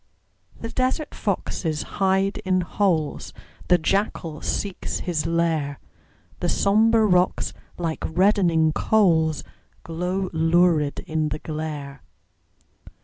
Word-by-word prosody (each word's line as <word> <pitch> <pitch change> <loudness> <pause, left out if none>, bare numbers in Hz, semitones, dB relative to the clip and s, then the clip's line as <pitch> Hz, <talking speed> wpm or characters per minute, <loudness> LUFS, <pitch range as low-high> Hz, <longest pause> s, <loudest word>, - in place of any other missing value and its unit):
The 230 - -5
desert 260 +4 -1
foxes 155 -4 -2 0.2
hide 195 +1 +2
in 185 -1 +1
holes, 175 -4 -1 0.3
The 180 - +5
jackal 170 -3 -1
seeks 200 -3 -3
his 165 -3 -1
lair; 165 -4 0 0.6
The - - -1
sombre 220 +2 +3
rocks, 180 -2 +2 0.2
like 165 -2 -3
reddening 175 -3 +3
coals, 160 -8 +2 0.4
Glow 180 +3 -3
lurid 165 -2 +2
in 155 -3 -2
the 150 - -3
glare. 150 -3 -6
170 Hz, 100 wpm, -23 LUFS, 160-195 Hz, 0.6 s, The